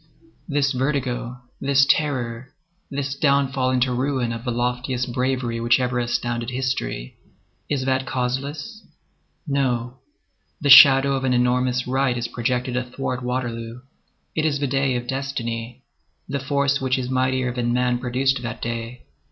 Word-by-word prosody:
This 140 -2 +1
vertigo, 125 -2 -2 0.2
this 140 0 +3
terror, 130 -3 0 0.3
this 140 -1 -3
downfall 140 -3 +1
into 130 0 +1
ruin 130 -2 -1
of 115 0 -6
the 125 - -3
loftiest 125 +1 -2
bravery 125 -2 -1
which 120 +1 +3
ever 125 -1 0
astounded 120 0 -2
history,—is 125 - -5
that 130 0 0
causeless? 140 - -3 0.6
No. 130 -3 -1 0.6
The 145 -2 +2
shadow 140 -1 +9
of 135 -1 -1
an 130 -1 +2
enormous 125 0 +1
right 130 -1 +1
is 120 -1 -2
projected 125 +1 -2
athwart 125 0 -3
Waterloo. 120 -1 -4 0.5
It 155 - -1
is 150 -3 +1
the 145 - 0
day 135 -1 +1
of 120 0 -3
destiny. 125 -2 -4 0.4
The 140 +1 -2
force 140 0 0
which 130 0 +1
is 130 0 -3
mightier 130 -1 0
than 120 -1 -1
man 125 0 +1
produced 130 +1 0
that 120 -2 -5
day. 115 +1 -5
130 Hz, 140 wpm, -23 LUFS, 120-135 Hz, 0.6 s, shadow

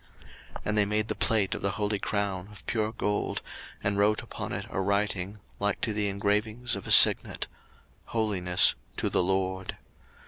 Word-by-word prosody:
02:039:030 - - -8
And 105 0 -1
they 105 - +4
made 105 +1 -1
the - - 0
plate 105 -4 +1
of - - -5
the 100 - 0
holy 105 -1 -2
crown 100 -3 -3
of 105 - -15
pure 110 -1 -1
gold, 105 -2 -2 0.4
and 100 0 0
wrote 105 +2 +2
upon 110 -2 -7
it 100 +1 -4
a 95 - -2
writing, 100 0 -1 0.2
like 100 0 -1
to 110 - -1
the 105 -1 +1
engravings 105 +4 -1
of 100 - -8
a - - -2
signet, - - +7 0.6
HOLINESS 95 -6 +2 0.2
TO - - -2
THE - - +3
LORD. 95 0 -1
100 Hz, 175 wpm, -27 LUFS, 95-105 Hz, 0.6 s, signet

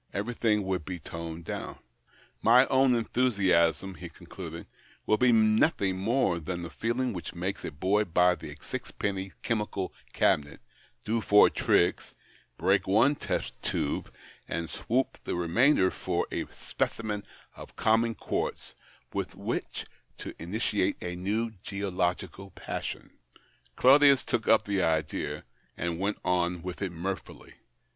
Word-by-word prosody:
Everything 105 0 +1
would 95 -3 -2
be 90 +2 -5
toned 85 0 -7
down. - - -5 0.3
" - - -34 0.3
My 125 +4 +6
own 130 -1 +4
enthusiasm," 95 -7 +2
he 90 -1 -9
concluded, - - -9 0.2
" - - -30
would 110 - +2
be 125 -1 +5
nothing 110 - +3
more 100 -4 +1
than 85 +2 -4
the 85 - -7
feeling 120 +2 -1
which 90 -1 -6
makes 90 +3 -3
a - - -3
boy 95 +8 +1
buy 90 0 +4
the - - -9
sixpenny 95 -2 -4
chemical 105 -4 -2 0.2
cabinet, 75 -1 +1 0.5
do 115 +1 0
lour 105 - +8
tricks, 85 - +1 0.4
l)reak - - +2
one 110 +9 +5
test - - -3
tube, 70 - -2 0.4
and 85 0 -3
swop 130 +3 -1
the - - -2
remainder 95 - +3
for - - -1
a - - -2
specimen 105 -2 -3 0.3
of - - -12
common 115 +1 +2
quartz - - -3 0.4
with - - -3
which - - -4 0.3
to - - -7
initiate 100 +2 0
a 90 0 -3
new 105 +6 -1
geological 95 -1 -2
passion." 90 - -6 0.6
Claudius 140 +1 +6
took 120 -3 -1
up 110 - +5
the 100 -2 0
idea, 80 -3 -1 0.3
and 85 0 -2
went 100 +2 -1
on 90 -1 +1
with 90 +1 -6
it 95 -3 -1
mirthfully. 95 +3 -6
100 Hz, 135 wpm, -29 LUFS, 90-115 Hz, 0.6 s, lour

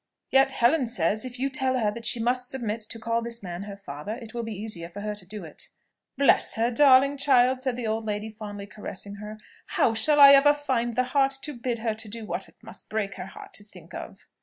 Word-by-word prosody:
Yet, 270 0 +4
Helen 255 +3 +3
says, 215 +1 +1
if 250 -1 -7
you 265 +2 0
tell 260 -1 0
her 215 -4 +1
that 230 +1 -5
she 240 - +2
must 250 +2 0
submit 230 -4 -3
to - - -6
call 230 +1 -1
this 235 -1 -6
man 175 -1 -5
her 200 0 -8
father, 200 +2 -6
it 225 -3 -11
will 240 - -3
be 225 -1 -5
easier 190 -6 -5
for 205 +4 -8
her 210 0 -3
to 200 -3 -10
do 210 +1 -7
it." - - -8 0.5
"Bless 280 - +4
her, 230 +2 +1
darling 275 +1 +5
child!" 260 -2 +4
said 260 -2 -1
the 245 -1 -4
old 220 +1 -1
lady, 210 +1 -3
fondly 205 -2 -8
caressing 205 -1 -7
her; 210 +1 -8 0.3
"how 225 - +2
shall 290 +7 +3
I 280 -1 +11
ever 285 +1 +7
find 245 -5 -1
the 255 - +3
heart 270 +1 +1
to 300 - -3
bid 240 -1 -3
her 225 -1 -1
do 220 +1 -7
what - - -4
it - - -24
must - - -8
break 210 -2 -2
her 180 - -6
heart - - -12
to 205 - -6
think 205 - -16
of?" - - -9
230 Hz, 235 wpm, -26 LUFS, 210-260 Hz, 0.5 s, I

